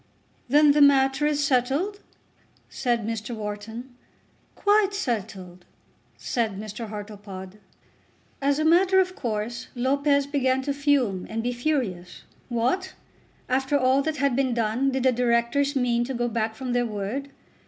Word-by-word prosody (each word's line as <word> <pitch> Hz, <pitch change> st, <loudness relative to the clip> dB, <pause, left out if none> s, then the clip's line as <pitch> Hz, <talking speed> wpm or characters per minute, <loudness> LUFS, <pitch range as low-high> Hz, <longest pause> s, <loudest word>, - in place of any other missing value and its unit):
"Then 295 Hz, +2 st, +6 dB
the 295 Hz, +1 st, +3 dB
matter 275 Hz, 0 st, +4 dB
is 295 Hz, -1 st, +1 dB
settled?" 280 Hz, +10 st, 0 dB, 0.7 s
said 240 Hz, -4 st, -1 dB
Mr. 225 Hz, +1 st, -4 dB
Wharton. 220 Hz, +4 st, -7 dB, 0.6 s
"Quite 410 Hz, -1 st, +2 dB
settled," 200 Hz, -, -4 dB, 0.5 s
said 225 Hz, -5 st, -2 dB
Mr. 215 Hz, +2 st, -6 dB
Hartlepod. 205 Hz, -2 st, -8 dB, 0.8 s
As 280 Hz, +1 st, +2 dB
a 310 Hz, -, 0 dB
matter 370 Hz, +4 st, +5 dB
of 370 Hz, 0 st, +1 dB
course 230 Hz, 0 st, -4 dB
Lopez 280 Hz, +3 st, +2 dB
began 265 Hz, -2 st, 0 dB
to 280 Hz, +1 st, -1 dB
fume 275 Hz, -10 st, +1 dB
and 225 Hz, +1 st, -3 dB
to 245 Hz, -, 0 dB
be -, -, -2 dB
furious. 240 Hz, -, -2 dB, 0.3 s
What! 255 Hz, +11 st, -1 dB, 0.5 s
after 265 Hz, +2 st, +1 dB
all 260 Hz, 0 st, +3 dB
that 310 Hz, +1 st, -2 dB
had 280 Hz, -2 st, +1 dB
been 260 Hz, -2 st, +1 dB
done 235 Hz, +4 st, +1 dB
did 265 Hz, -1 st, -1 dB
the 260 Hz, -, +5 dB
Directors 245 Hz, +4 st, +1 dB
mean 240 Hz, -2 st, +1 dB
to 265 Hz, +1 st, -4 dB
go 240 Hz, 0 st, 0 dB
back 225 Hz, -1 st, -2 dB
from 255 Hz, 0 st, -4 dB
their 245 Hz, -1 st, +1 dB
word? 220 Hz, +7 st, -4 dB
250 Hz, 145 wpm, -25 LUFS, 225-280 Hz, 0.8 s, Then